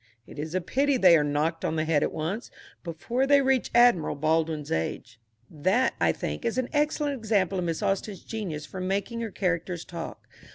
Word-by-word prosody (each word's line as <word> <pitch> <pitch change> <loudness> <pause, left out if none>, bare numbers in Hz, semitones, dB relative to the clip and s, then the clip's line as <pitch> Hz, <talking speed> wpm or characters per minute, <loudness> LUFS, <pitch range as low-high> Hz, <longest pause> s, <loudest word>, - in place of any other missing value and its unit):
It - - -11
is 155 +3 -4
a 185 - +1
pity 275 +9 +1
they 180 -7 +7
are 150 - +3
not 145 - -2
knocked 160 +3 -1
on - - -1
the 155 0 0
head 155 -2 +2
at - - 0
once, 185 +10 -4 0.3
before 230 +10 -2
they 285 0 +6
reach 265 -1 +2
Admiral 240 -12 +5
Baldwin's 155 0 0
age. 110 +8 -3 0.3
That, 185 - +1
I - - +4
think, - - -5
is 235 +1 -1
an 255 -1 -1
excellent 295 -1 +1
example 205 -6 0
of 180 - -2
Miss 165 -2 -2
Austen's 195 0 -2
genius 180 -10 -5
for 185 - -7
making 200 +5 -2
her 230 - -3
characters 175 -3 -2
talk. 170 -2 -8
185 Hz, 200 wpm, -27 LUFS, 160-235 Hz, 0.3 s, they